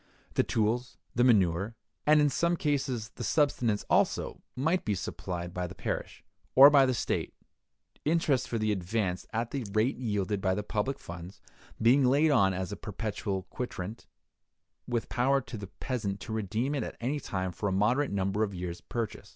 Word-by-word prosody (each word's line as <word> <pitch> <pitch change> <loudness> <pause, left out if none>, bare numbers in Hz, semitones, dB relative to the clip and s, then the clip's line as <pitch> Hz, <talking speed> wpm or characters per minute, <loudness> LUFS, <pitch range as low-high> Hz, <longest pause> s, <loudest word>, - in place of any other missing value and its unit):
The - - +3
tools, 115 +3 0 0.2
the 120 - +3
manure, 100 -3 +3 0.3
and 150 0 +7
in 145 -1 +4
some 170 +3 +1
cases 130 -7 -1
the - - -4
subsistence 120 -4 +1
also, - - +1
might 160 +8 +1
be 105 - 0
supplied 90 -1 -5
by 90 0 -2
the 90 - -10
parish, - - -4 0.3
or 140 +2 +10
by 140 -2 +6
the 130 - +2
state; - - -2 0.7
interest 150 -4 +2
for 115 - -2
the 110 -1 +1
advance, 95 -1 -1
at 115 +1 -2
the 135 -3 -2
rate 110 +5 +2
yielded 105 -4 -1
by 95 -1 +1
the 105 - -2
public 105 +7 -1
funds, 85 -1 -9 0.4
being 125 +5 +5
laid 145 +5 +4
on 100 -8 +4
as 95 +1 -3
a - - -3
perpetual 105 -2 -3
quitrent, 110 -4 -5 0.8
with 120 -2 -1
power 135 +2 +2
to 130 -2 -8
the 100 -2 -6
peasant 105 -3 -3
to 110 - -5
redeem 110 +6 -1
it 140 - 0
at - - -5
any 135 +5 -1
time 95 -7 -3
for 100 +3 -2
a - - -2
moderate 120 +9 +2
number 100 +1 0
of 100 -3 0
years' 90 -1 -5
purchase. 115 -3 -4
110 Hz, 180 wpm, -30 LUFS, 95-130 Hz, 0.8 s, or